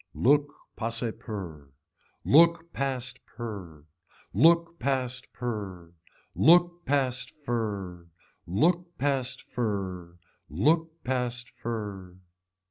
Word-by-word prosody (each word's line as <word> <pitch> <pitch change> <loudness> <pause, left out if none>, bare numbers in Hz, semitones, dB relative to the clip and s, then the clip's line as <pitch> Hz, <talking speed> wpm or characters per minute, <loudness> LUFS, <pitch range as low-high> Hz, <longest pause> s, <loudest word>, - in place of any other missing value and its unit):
Look 145 +2 +4 0.2
pase 115 +1 -1
per. 90 - -7 0.6
Look 170 +2 +5
past 130 -2 -2
per. 95 -10 -8 0.5
Look 170 - +4
past 130 -2 -1
per. 100 -8 -5 0.4
Look 175 +2 +5
past 130 -3 +1
fer. 100 -7 -3 0.4
Look 170 - +1
past 135 -3 0
fer. 95 -7 -3 0.3
Look 160 - +1
past 125 -1 -2
fer. 100 -6 -5
120 Hz, 85 wpm, -28 LUFS, 100-145 Hz, 0.6 s, Look